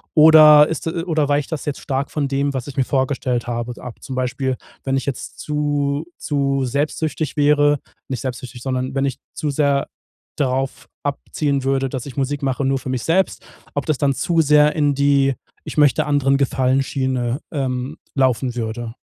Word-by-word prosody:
oder 155 -1 +8
ist 160 - -4
oder 160 -3 0
weicht 145 +1 0
das 150 - -4
jetzt 145 - -3
stark 135 0 -2
von 145 -2 -1
dem, 140 +1 0
was 130 +1 -4
ich 140 - -8
mir 135 - +3
vorgestellt 130 -2 -1
habe, 120 0 -3
ab? 125 -2 -9
Zum 130 - -6
Beispiel, 130 0 -1 0.3
wenn 135 0 0
ich 130 - -3
jetzt 140 - -5
zu 145 0 -1
zu 140 -2 0
selbstsüchtig 150 +3 -2
wäre 145 0 +4 0.3
nicht 130 -4 -3
selbstsüchtig, 125 -1 -6
sondern 130 +1 -2
wenn 135 0 +1
ich 135 - -2 0.2
zu 150 - -2
sehr 140 -1 +1 0.5
darauf 135 -1 -1 0.2
abzielen 140 0 -1
würde, 135 0 +1
dass 130 -1 -5
ich 140 -1 -9
Musik 140 +1 -1
mache 135 0 0
nur 135 0 +2
für 130 - -7
mich 130 -2 -2
selbst, 185 +4 +1 0.3
ob 145 - -1
das 155 -4 0
dann 140 -1 +2
zu 165 +5 +1
sehr 150 0 +4
in 145 -2 +2
die 140 -1 +3 0.3
„Ich - - -6
möchte 145 -4 +4
anderen 140 -2 +2
Gefallen 135 -1 +2
Schiene“, 130 -2 -1
ähm, 135 0 -3 0.2
laufen 130 -2 +1
würde. 115 0 -4
140 Hz, 180 wpm, -20 LUFS, 130-145 Hz, 0.5 s, oder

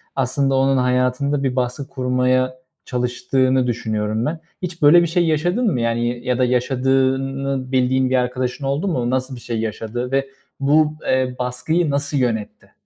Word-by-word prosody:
aslında 135 +1 +1
onun 135 0 +3
hayatında 125 +3 +1
bir 130 -2 0
baskı 125 +2 -2
kurmaya 130 0 0 0.2
çalıştığını 130 +1 0
düşünüyorum 110 -1 -1
ben. 160 +2 -2 0.2
Hiç 175 -2 -5
böyle 150 +4 +7
bir 170 - +1
şey 175 +1 +1
yaşadın 175 +9 +1
mı 120 - -1
yani? 115 0 0
Y 120 0 -3
ya 125 -1 0
da 130 - +3
yaşadığını 135 +1 0
bildiğin 130 0 +2
bir 130 - +1
arkadaşın 125 +2 -1
oldu 140 +8 -1
mu? 125 -9 -1
Nasıl 130 +1 -1
bir - - -10
şey 115 -2 -3
yaşadı 115 +3 -4
ve 135 0 +1 0.3
bu, 150 +2 +3
eee, 130 -1 +1
baskıyı 145 +7 0
nasıl 145 +1 0
yönetti? 115 -5 -2
130 Hz, 165 wpm, -20 LUFS, 125-140 Hz, 0.3 s, böyle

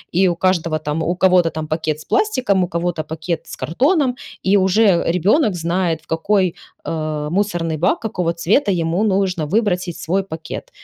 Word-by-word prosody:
и 190 +2 +4
у 175 - -1
каждого 170 -3 0
там, 155 +1 -2
у 175 +3 0
кого-то 180 -2 +4
там 155 -1 -5
пакет 155 -1 -2
с - - -12
пластиком, 255 - +1
у - - -1
кого-то 170 -1 -2
пакет 160 +1 -4
с - - -7
картоном, 265 - +1 0.3
и 190 +2 +3
уже 190 -1 +3
ребенок 195 - +2
знает 170 -1 -1
в 160 - -29
какой, 185 +2 +1 0.3
э, 155 -2 -3
мусорный 175 -4 -1
бак, 165 - +1
какого 180 -6 -2
цвета 200 - +1
ему 170 +2 0
нужно 190 -6 0
выбросить 180 -2 0
свой 190 +4 -1
пакет. 160 -4 -7
175 Hz, 170 wpm, -19 LUFS, 160-195 Hz, 0.3 s, и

